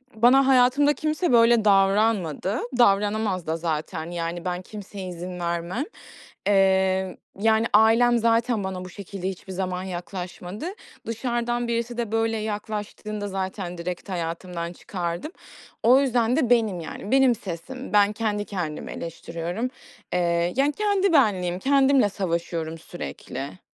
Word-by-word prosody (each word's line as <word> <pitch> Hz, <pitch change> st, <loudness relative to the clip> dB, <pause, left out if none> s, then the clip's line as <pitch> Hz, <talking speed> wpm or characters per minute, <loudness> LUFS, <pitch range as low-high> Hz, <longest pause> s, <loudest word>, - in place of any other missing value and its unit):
bana 255 Hz, +4 st, +5 dB
hayatımda 270 Hz, +3 st, +5 dB
kimse 310 Hz, +1 st, -1 dB
böyle 230 Hz, -1 st, +5 dB
davranmadı. 195 Hz, -, +2 dB, 0.2 s
Davranamaz 205 Hz, -4 st, +2 dB
da 160 Hz, +1 st, 0 dB
zaten. 160 Hz, +1 st, -3 dB
Yani, 170 Hz, 0 st, -4 dB
ben 180 Hz, 0 st, -2 dB
kimseye 200 Hz, -1 st, -8 dB
izin 180 Hz, +1 st, -6 dB
vermem. 170 Hz, +8 st, -2 dB, 0.6 s
Eee, 190 Hz, -1 st, +3 dB, 0.2 s
yani, 220 Hz, +1 st, +3 dB
ailem 230 Hz, +3 st, +5 dB
zaten 230 Hz, -1 st, +2 dB
bana 185 Hz, -1 st, -4 dB
bu -, -, -8 dB
şekilde 190 Hz, 0 st, -5 dB
hiçbir 190 Hz, 0 st, -8 dB
zaman 185 Hz, -1 st, -2 dB
yaklaşmadı. 180 Hz, -, -6 dB, 0.4 s
Dışarıdan 240 Hz, +1 st, -1 dB
birisi 235 Hz, +1 st, -2 dB
de 230 Hz, -3 st, -2 dB
böyle 225 Hz, 0 st, +1 dB
yaklaştığında 210 Hz, 0 st, -4 dB
zaten 190 Hz, -2 st, -4 dB
direkt 175 Hz, +3 st, -5 dB
hayatımdan 170 Hz, 0 st, -4 dB
çıkardım. 175 Hz, -, -4 dB, 0.5 s
O 250 Hz, +4 st, +7 dB
yüzden 245 Hz, -2 st, +2 dB
de 270 Hz, -7 st, +1 dB
benim, 220 Hz, -7 st, +3 dB
yani. 195 Hz, +6 st, -7 dB
Benim 265 Hz, -3 st, +5 dB
sesim. 205 Hz, +8 st, -7 dB
Ben 205 Hz, 0 st, +5 dB
kendi 210 Hz, -1 st, -1 dB
kendimi 175 Hz, -7 st, -4 dB
eleştiriyorum. 170 Hz, +6 st, -4 dB, 0.4 s
Eee, 170 Hz, 0 st, +1 dB
yani 275 Hz, +2 st, +3 dB
kendi 400 Hz, 0 st, +1 dB
benliğim, 185 Hz, -, +3 dB
kendimle 275 Hz, -2 st, +4 dB
savaşıyorum 170 Hz, -4 st, -3 dB
sürekli. 165 Hz, -1 st, -7 dB
200 Hz, 125 wpm, -25 LUFS, 180-235 Hz, 0.6 s, O